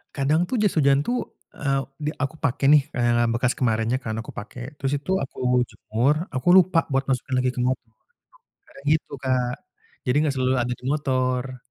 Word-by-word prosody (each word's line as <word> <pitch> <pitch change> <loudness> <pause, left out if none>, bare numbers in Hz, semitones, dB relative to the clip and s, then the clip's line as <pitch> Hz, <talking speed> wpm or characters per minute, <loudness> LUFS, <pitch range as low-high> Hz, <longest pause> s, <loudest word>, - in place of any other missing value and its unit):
Kadang 145 +4 +2
tuh - - -1
jas 205 -3 +2
hujan 140 -2 +4
tuh, 245 - 0 0.4
e - - -8 0.4
di 150 - +1
aku 140 +3 -3
pake 140 +1 -1
nih, 150 -2 +7
eee, 120 -1 +2
bekas 120 +2 +1
kemarinnya 115 0 +1
kan 110 - -3
aku - - -12
pake. 110 +4 -10 0.2
Terus 135 0 -2
itu 185 - -4
aku 135 - -9 0.3
jemur, 120 +7 0 0.2
aku 130 - -3
lupa 185 -2 +5
buat 135 +1 +2
masukin 130 0 -1
lagi 125 0 +2
ke - - -4
motor. 130 -2 -2 0.8
Kadang 140 - -16
gitu 155 - -2
Kak, 125 -2 +1 0.5
jadi 125 - +1
nggak 150 -3 +1
selalu 130 0 +2
ada 125 +1 -1
di - - -23
motor. 130 -3 -1
130 Hz, 185 wpm, -24 LUFS, 125-145 Hz, 0.8 s, nih